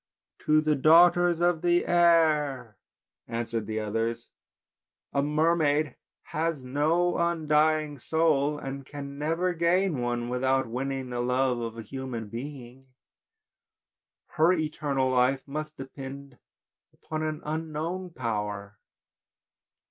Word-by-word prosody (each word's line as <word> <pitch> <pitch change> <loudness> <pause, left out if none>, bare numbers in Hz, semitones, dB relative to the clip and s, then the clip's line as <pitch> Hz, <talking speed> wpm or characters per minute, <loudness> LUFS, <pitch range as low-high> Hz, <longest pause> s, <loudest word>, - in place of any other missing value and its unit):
"To 155 0 +5
the 155 -1 +2
daughters 170 +3 +5
of 175 -2 +2
the 175 0 +2
air!" 155 -9 +3 0.5
answered 115 -2 -3
the 110 0 -2
others, 115 +2 -2 0.8
"a 140 - +2
mermaid 150 -1 +1 0.3
has 160 -3 -2
no 155 +7 +1
undying 155 -3 +1
soul, 150 0 +1
and 135 0 -6
can 140 0 -8
never 165 +4 0
gain 170 -1 +1
one 120 -1 -2
without 130 +2 +1
wanning 130 +2 -4
the 120 - -3
love 125 0 +1
of 115 -1 -5
a 115 - -6
human 120 -2 -6
being. 130 +1 -8 1.4
Her 160 +3 +2
eternal 150 -5 -1
life 130 +2 +2
must 155 +2 -5
depend 135 0 -9 0.5
upon 155 0 -6
an 155 -1 -3
unknown 160 +4 -3
power. 105 - -4
145 Hz, 110 wpm, -27 LUFS, 125-160 Hz, 1.4 s, To